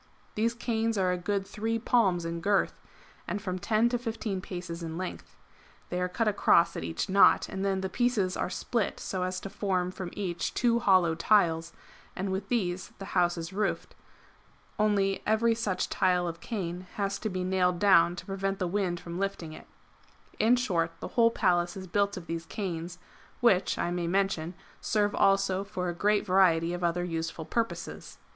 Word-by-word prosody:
These 230 +2 0
canes 225 -2 -1
are 185 -2 +2
a 180 -1 -3
o - - +1
ood 200 -1 0
3 225 +3 -2
palms 200 -7 +2
in 165 0 -4
girth, 200 +2 +2 0.5
and 205 - -2
from 185 -3 -4
10 220 +4 +2
to 245 0 -1
15 225 -5 -3
paces 175 -2 -6
in 165 -1 -5
length. 185 0 -6 0.5
[They 180 0 -2
are 180 - 0
cut 225 +4 -1
across 195 -4 +4
at - - -4
each 165 - -3
knot, 195 0 +5
and 190 0 -4
then 195 -1 0
the 190 - -1
pieces 210 -3 0
are - - -2
split 220 +3 -2
so 185 - -3
as 185 0 -2
to 195 - -6
form 185 -3 -1
from 185 -1 -6
each 180 -4 -3
two 235 -2 +3
hollow 185 -7 +4
tiles, 165 -2 +2 0.4
and 190 +1 -2
with 190 +1 -3
these 185 -7 -1
the 195 - -7
house 175 -1 +2
is 165 +2 -6
roofed; 205 0 -2 0.9
only 200 -2 +2
every 225 +2 +3
such 210 -5 -1
tile 180 -2 +1
of 170 0 -5
cane 185 -5 -5
has 200 -1 -1
to 220 - -2
be 185 -1 -3
nailed 180 -1 +1
down 175 -3 +5
to - - -8
prevent 195 0 -2
the 185 - -1
wind 180 -1 -1
from 170 +1 -6
lifting 195 -5 -3
it] - - -12 0.7
In 230 +3 +5
short, 170 -9 -1
the - - -6
whole 230 -1 +4
Palace 175 -5 +1
is 190 - -6
built 200 +2 0
of 175 - -7
these 165 0 -5
canes, 175 -3 -4 0.4
which 200 -6 +3
(I 175 - -1
may 175 -1 -2
mention) 180 -2 0 0.2
serve 205 -1 +1
also 195 -1 +2
for 180 -3 -3
a - - -2
great 205 +4 +1
variety 175 -3 +3
of 175 0 -4
other 175 +1 +1
useful 165 -1 -4
purposes. 230 +7 -4
190 Hz, 190 wpm, -29 LUFS, 175-205 Hz, 0.9 s, knot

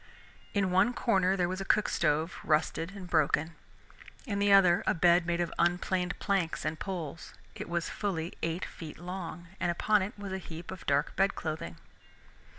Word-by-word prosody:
In 195 -2 +2
one 215 +7 +3
corner 190 -4 +2
there 175 -2 +2
was 185 +2 -3
a - - -1
cook 210 +2 +2
stove, 155 +4 0
rusted 165 +3 0
and 190 -3 -8
broken. 160 0 +2 0.7
In 200 -5 -2
the 200 0 +3
other 185 -3 +6
a - - +3
bed 175 0 +4
made 170 0 0
of 175 -1 -1
unplaned 180 +1 +1
planks 190 -7 -1
and 155 0 -2
poles. 170 -5 -5 0.2
It - - -7
was 170 -1 -1
fully 175 -5 -3
eight 165 +2 -1
feet 160 -3 -9
long, 175 -1 -6
and - - 0
upon 210 +4 +2
it 200 +4 -4
was 200 -1 -6
a 190 - -2
heap 170 -1 -8
of 190 - -9
dark 140 +2 +1
bed 195 +1 +2
clothing. 155 - -4
175 Hz, 180 wpm, -30 LUFS, 165-195 Hz, 0.7 s, other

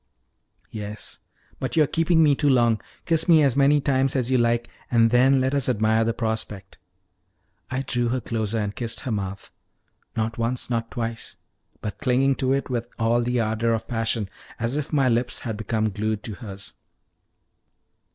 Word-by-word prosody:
"Yes; 105 0 -5 0.4
but 125 -2 -3
you 155 - +6
are - - +3
keeping 165 +2 +3
me 150 -2 +5
too 145 +1 +1
long. 120 -4 +3 0.2
Kiss 165 -2 +1
me 160 -3 +7
as 135 -4 +2
many 140 +1 +4
times 135 -1 +1
as 130 -1 0
you 130 - +4
like, 120 0 +1 0.2
and 115 -2 +4
then 130 +2 +5
let 130 +1 0
us 140 -2 +1
admire 110 -1 +2
the 115 - +1
prospect." 110 -4 -4 0.9
I 130 +1 -2
drew 120 -2 0
her 130 +2 0
closer 110 -2 -2
and 105 -1 -2
kissed 115 -2 -3
her 130 - -4
mouth, 100 -2 -4 0.6
not 110 +1 -2
once 120 +2 -1
nor 115 -1 +2
twice, 115 -1 -5 0.4
but 105 - -5
clinging 135 -1 +2
to 130 0 0
it 140 0 0
with 120 -2 -2
all 115 +1 +2
the 125 +1 0
ardor 115 +1 +1
of 110 - -5
passion, 115 -2 -1 0.3
as 120 +3 -2
if 150 0 -3
my 140 -4 +3
lips 120 +1 0
had 110 -2 -3
become 110 0 -1
glued 110 +1 -2
to 110 - -5
hers. 100 -3 -8
120 Hz, 180 wpm, -24 LUFS, 110-130 Hz, 0.9 s, me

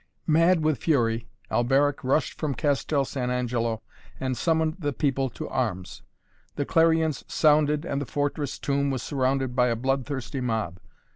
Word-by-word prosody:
Mad 165 +1 +4
with 155 -3 +1
fury, 115 -7 +1 0.2
Alberic 135 +4 +2
rushed 135 +3 +1
from 150 -4 -1
Castel 145 -1 +1
San 125 -2 -3
Angelo 120 -3 -1 0.4
and 130 -1 -1
summoned 160 +2 +1
the 145 -4 -1
people 135 -1 0
to - - -7
arms. 95 -8 -3 0.5
The 145 - -1
clarions 160 -2 +2
sounded 150 0 +3
and 140 -3 -2
the 140 - -4
fortress 145 0 -2
tomb 140 0 0
was 130 -3 -2
surrounded 130 -2 0
by 125 -1 +4
a 120 - +1
blood 130 +2 -1
thirsty 135 -1 -4
mob. 110 -7 -2
135 Hz, 155 wpm, -26 LUFS, 125-150 Hz, 0.5 s, Mad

